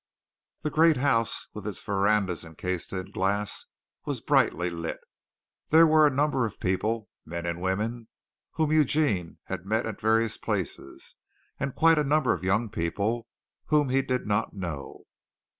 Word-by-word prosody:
The 150 - -1
great 160 0 +5
house 125 -4 +1
with - - -7
its - - -4
verandas 100 -2 +1
encased 85 +2 -4
in 95 -1 -5
glass 100 +2 -1 0.4
was - - -3
brightly 90 +1 +2
lit. 85 -1 -4 0.7
There 160 +2 +7
were 155 -1 +6
a - - +4
number 140 -1 +1
of 105 - -11
people 105 +4 -1
men 85 +1 -5
and 85 0 -3
women, 110 +5 -2 0.5
whom 155 -1 0
Eugene 145 - +2
had 95 - -6
met 110 +2 +1
at 110 -2 -6
various 115 +1 +2
places, 100 -6 -4 0.4
and 140 -1 -3
quite 165 -1 +5
a - - +2
number 145 -1 +2
of 90 - -6
young 100 +5 +1
people 105 +5 -2 0.4
whom 150 -3 +3
he 135 +1 +3
did 130 -1 -2
not 105 +1 -1
know. 85 -8 -6
110 Hz, 155 wpm, -27 LUFS, 95-140 Hz, 0.7 s, There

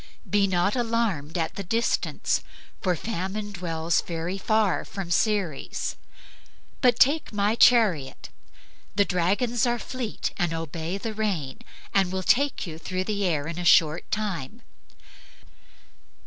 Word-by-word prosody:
Be 205 -1 +3
not 185 +3 +1
alarmed 225 - -1
at 165 -1 -1
the 200 - -5
distance" 225 +6 0 0.4
(for 180 -2 +1
Famine 205 +2 -4
dwells 170 -3 0
very 170 +3 -4
far 215 -2 +1
from 195 -3 -6
Ceres), 195 -6 0 0.9
"but 245 -3 +4
take 295 +4 +4
my 205 0 +1
chariot. 215 - +3 0.7
The 200 0 +4
dragons 205 +8 +1
are 240 0 +1
fleet 240 -1 -4
and 175 -3 0
obey 165 +3 -4
the 220 +2 -4
rein, 190 -11 -2 0.3
and 195 -2 +3
will 190 0 -2
take 280 +5 +2
you 160 -2 -7
through 185 +3 -3
the 205 0 -2
air 155 -5 0
in 170 +2 -5
a - - -3
short 160 -2 +4
time." 210 - -3
195 Hz, 135 wpm, -26 LUFS, 170-220 Hz, 0.9 s, but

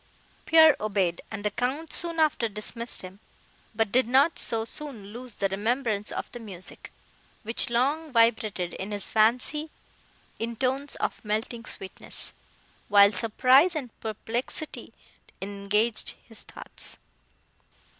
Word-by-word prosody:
Pierre 320 -2 +7
obeyed, 195 -5 0
and 210 -1 -6
the 210 - +1
Count 265 +9 -2
soon 335 -2 -1
after 295 -7 +2
dismissed 215 +3 -4
him, 185 +2 -10 0.6
but 220 -2 +1
did 255 +1 +3
not 275 +6 +3
so 225 -1 +3
soon 230 -6 -4
lose 245 -1 -8
the 195 - 0
remembrance 215 +1 -1
of - - -4
the 240 - -8
music, 190 -5 -5 0.5
which 225 +2 +2
long 285 +6 0
vibrated 220 -6 +2
in 190 - -6
his 205 -2 0
fancy 250 +8 +2 0.7
in 230 +1 -3
tones 265 +3 -1
of - - -3
melting 225 +2 -3
sweetness, 190 - -4 0.5
while 200 0 +7
surprise 255 - +4
and 265 -6 -4
perplexity 230 +7 -4 0.5
engaged 205 +3 0
his 225 -3 -11
thoughts. - - -6
230 Hz, 125 wpm, -27 LUFS, 210-260 Hz, 0.7 s, Pierre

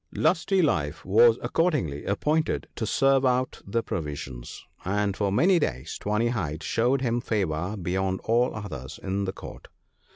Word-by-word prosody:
" - - -17
Lusty 190 -2 +2
life 80 - 0
was 115 +4 +6
accordingly 145 - 0
appointed 155 +10 0
to 110 - -3
serve 135 +3 +3
out 130 0 +1
the 115 +3 0
provisions, 70 -6 -6 0.2
and 100 +1 0
for 100 -1 0
many 175 - +4
days 65 - -3
Tawny 105 +3 0
hide 80 -10 -3
showed 125 +4 +1
him 120 -2 0
favour 95 -3 -1
beyond 95 +1 -1
all 120 +2 +2
others 85 -12 -7
in 100 +1 -1
the 95 - -2
Court. - - -10
105 Hz, 155 wpm, -26 LUFS, 90-125 Hz, 0.2 s, was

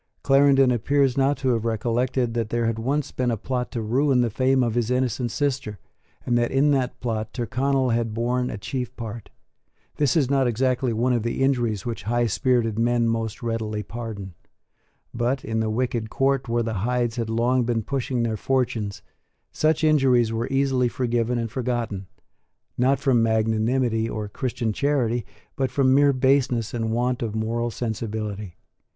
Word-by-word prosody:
Clarendon 135 -1 +5
appears 135 +2 +2
not 140 +1 +2
to 130 - -1
have 115 -3 +1
recollected 120 +2 0
that 115 -2 -2
there 120 0 0
had 115 0 -1
once 140 +5 -1
been 125 -1 -1
a 115 - 0
plot 125 +3 -3
to 115 - -2
ruin 130 +3 +2
the 120 -2 0
fame 130 +3 +2
of 115 -2 0
his 120 -1 0
innocent 125 -1 0
sister, 130 -5 -2 0.5
and 120 - +1
that 120 - +1
in 140 +2 +3
that 130 -2 0
plot 110 -3 -2
Tyrconnel 130 +2 0
had 115 -1 0
borne 125 +2 0
a - - -5
chief 125 +4 -4
part. 115 -1 -7 0.7
This 145 0 +2
is 140 -5 +3
not 135 -1 +2
exactly 125 +1 +1
one 120 +3 +1
of 120 - +1
the 115 +4 -1
injuries 120 -6 0
which 120 -2 -4
high 120 0 +2
spirited 115 -1 +1
men 120 0 +2
most 115 0 -2
readily 110 -2 -2
pardon. 110 -5 -7 0.8
But, 125 +3 -1
in 110 0 -1
the 110 0 0
wicked 115 -1 -1
court 135 0 0
where 120 0 +1
the 110 -4 -3
Hydes 120 0 0
had 115 -2 -2
long 120 +3 +2
been 115 -1 -1
pushing 130 0 -2
their 110 -2 -1
fortunes, 115 -5 -1 0.5
such 155 0 +1
injuries 130 -7 +3
were 115 +2 -1
easily 135 -2 +2
forgiven 120 -1 -1
and 115 -2 -3
forgotten, 120 -6 -3 0.7
not 130 +3 +2
from 135 -4 +3
magnanimity 110 +1 +1
or 105 -1 -4
Christian 115 0 -2
charity, 120 -4 0 0.3
but 130 -1 0
from 130 +1 +3
mere 140 +1 +5
baseness 130 -3 +1
and 115 -2 -1
want 125 +2 0
of 110 -2 -3
moral 115 +2 -1
sensibility. 105 -5 -4
120 Hz, 170 wpm, -24 LUFS, 115-130 Hz, 0.8 s, Clarendon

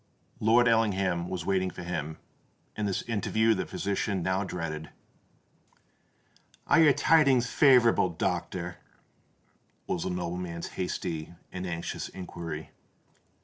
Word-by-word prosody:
Lord 120 +3 +4
Ellingham 95 -6 +1
was 90 -3 -4
waiting 95 -1 +1
for 90 - -8
him; 80 -3 -4 0.6
and 105 -1 -1
this 95 - -1
interview 110 0 +1
the 95 - -3
physician 100 -1 -2
now 95 +3 0
dreaded. 80 -5 -5 1.8
"Are 165 - +5
your 155 -2 +7
tidings 140 -7 +4
favourable, 120 -7 +5
doctor?" 85 - -3 1.1
was 90 - -2
the - - -2
nobleman's 90 -1 -4
hasty 85 -2 -4 0.2
and 90 0 -5
anxious 85 -1 -4
inquiry. 85 -4 -7
95 Hz, 110 wpm, -28 LUFS, 85-110 Hz, 1.8 s, your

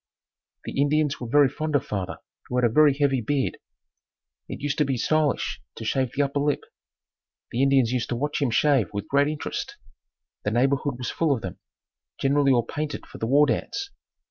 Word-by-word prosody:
The 140 - -1
Indians 150 0 +1
were 120 - -4
very 145 +2 +5
fond 155 +3 -3
of 140 - +1
father 95 -2 -4 0.3
who 125 - -4
had 125 - +3
a 115 - +1
very 150 -1 +5
heavy 140 -3 +1
beard. 135 +4 -1 0.9
It - - -6
used 145 +1 -2
to - - +5
be 135 -3 -1
stylish 150 +4 0
to 110 - -7
shave 130 +1 0
the 145 - +3
upper 140 +1 -1
lip. 145 0 0 0.9
The 120 - -1
Indians 135 -3 +4
used 125 -2 -1
to 120 - -1
watch 145 +4 -2
him 140 - +2
shave 130 - +2
with 100 0 -4
great 140 +1 +3
interest. 150 -1 -4 0.6
The - - -1
neighborhood 135 +3 +1
was 125 -1 -4
full 165 -3 +1
of 115 - -7
them, 95 - -6 0.6
generally 140 0 +3
all 120 -2 +3
painted 150 +5 -4
for - - -12
the 115 - -2
war 145 +4 +5
dance. 270 - -2
140 Hz, 195 wpm, -25 LUFS, 120-145 Hz, 0.9 s, very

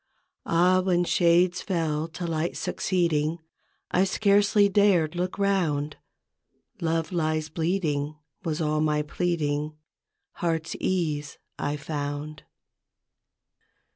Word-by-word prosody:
Ah, 180 +2 +4
when 180 -1 +2
shades 175 +1 +3
fell 160 -4 -1
to 170 +2 -6
light 165 0 -2
succeeding, 165 -3 0 0.5
I 185 - +3
scarcely 200 +1 +3
dared 190 -6 +3
look 180 +1 -2
round: 170 -8 0 0.4
" - - -53 0.3
Love 165 -1 0
lies 155 -2 -1
bleeding 155 -3 -1
" 140 - -46
was 160 -3 -2
all 155 0 +1
my 150 -1 +1
pleading, 150 -2 -1 0.6
Heartsease 160 -2 -1 0.2
I 145 +1 -1
found. 145 0 -5
165 Hz, 105 wpm, -26 LUFS, 150-180 Hz, 0.6 s, Ah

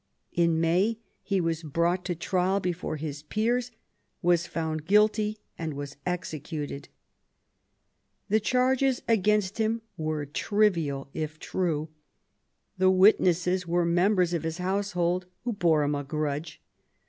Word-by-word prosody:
In 170 -2 +2
May 180 +7 +2 0.2
he 195 -2 0
was 165 -2 -1
brought 170 +4 0
to 175 - -1
trial 185 +3 +1
before 180 -3 -3
his 145 -1 -5
peers, 235 +9 0 0.5
was 175 -1 +3
found 160 -2 -3
guilty, 210 +1 +3 0.2
and 160 -3 -3
was 140 0 -6
executed. 155 -4 -4 1.4
The 215 +2 +3
charges 255 +3 +2
against 210 -1 +2
him 225 +1 0
were 155 -2 -2
trivial 155 -5 0
if 155 -1 -4
true; 160 -3 -2 0.9
the 185 0 +5
witnesses 185 -2 +4
were 175 0 +2
members 180 +1 +2
of 170 - 0
his 160 0 -3
household 180 -1 -1 0.2
who 245 -1 -1
bore 165 -6 +3
him 145 0 0
a 145 0 -2
grudge. 150 +1 -3
175 Hz, 125 wpm, -27 LUFS, 155-200 Hz, 1.4 s, the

